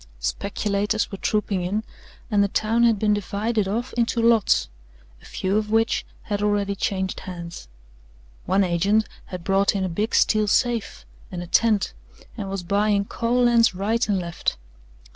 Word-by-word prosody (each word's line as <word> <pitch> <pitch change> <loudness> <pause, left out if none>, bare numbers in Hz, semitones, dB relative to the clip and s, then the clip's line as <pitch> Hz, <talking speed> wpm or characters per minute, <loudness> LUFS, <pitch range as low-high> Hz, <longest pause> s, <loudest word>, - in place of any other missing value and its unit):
Speculators 200 - -1
were 195 - -6
trooping 210 -3 0
in 200 +5 -1 0.5
and 205 -1 +4
the - - +2
town 220 +3 0
had 230 -2 +4
been 210 +1 +2
divided 205 +1 -1
off 230 +6 -3
into 235 0 0
lots 230 - +3 0.5
a - - -18
few 190 +2 -1
of 215 -1 -1
which 225 +1 +1 0.2
had 205 -1 -3
already 205 -1 +1
changed 190 -1 -2
hands. 170 - -8 0.8
One 195 +2 +3
agent 195 +5 +2 0.2
had 180 -2 -7
brought 195 +2 +2
in 195 - 0
a 185 - -1
big 210 +7 -1
steel 215 -1 +3
safe 220 - 0 0.3
and 175 -1 -5
a - - -7
tent 210 +3 +2 0.4
and 200 -4 -5
was 195 -2 -4
buying 200 +2 +1
coal 235 +3 0
lands 235 -4 +4
right 215 +4 0
and 200 - +2
left. 170 -2 -2
205 Hz, 160 wpm, -23 LUFS, 190-220 Hz, 0.8 s, and